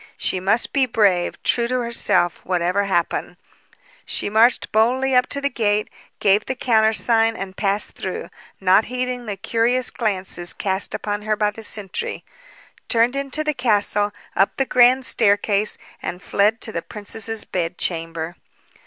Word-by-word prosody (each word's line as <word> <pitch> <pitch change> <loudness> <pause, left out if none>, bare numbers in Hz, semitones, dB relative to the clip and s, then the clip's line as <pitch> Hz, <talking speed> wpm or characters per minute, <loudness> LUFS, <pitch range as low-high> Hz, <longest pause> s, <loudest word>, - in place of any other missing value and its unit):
She 185 - -1
must 200 +6 0
be 270 -2 +2
brave, 200 -7 +1
true 235 -1 +1
to 255 +1 -1
herself, 235 -7 +1
whatever 180 +2 0
happened. 175 -1 -1 0.7
She - - -3
marched 230 +3 +3
boldly 255 +5 +2
up 250 0 +4
to 280 - -1
the 280 - 0
gate, 210 -3 0 0.3
gave 205 +1 +3
the 260 - -2
countersign 225 -1 +3
and 190 0 -6
passed 200 +1 -1
through, 185 - -6 0.3
not 190 +3 +4
heeding 250 -1 -4
the 205 -2 -4
curious 235 +5 +1
glances 190 -5 -1
cast 190 0 -1
upon 205 0 -3
her 215 0 0
by 210 0 +1
the 225 - -11
sentry; 205 -3 -3 0.7
turned 235 +3 +3
into 275 +2 -2
the 305 0 0
castle, 210 -4 +1 0.2
up 195 +2 +2
the 270 - +1
grand 255 +1 +4
staircase, 205 -2 +2 0.2
and 180 +2 -6
fled 210 +3 +1
to 220 - -2
the 170 - -3
princess's 220 +2 -3
bed 175 -1 -3
chamber. 165 0 -3
215 Hz, 155 wpm, -21 LUFS, 195-240 Hz, 0.7 s, up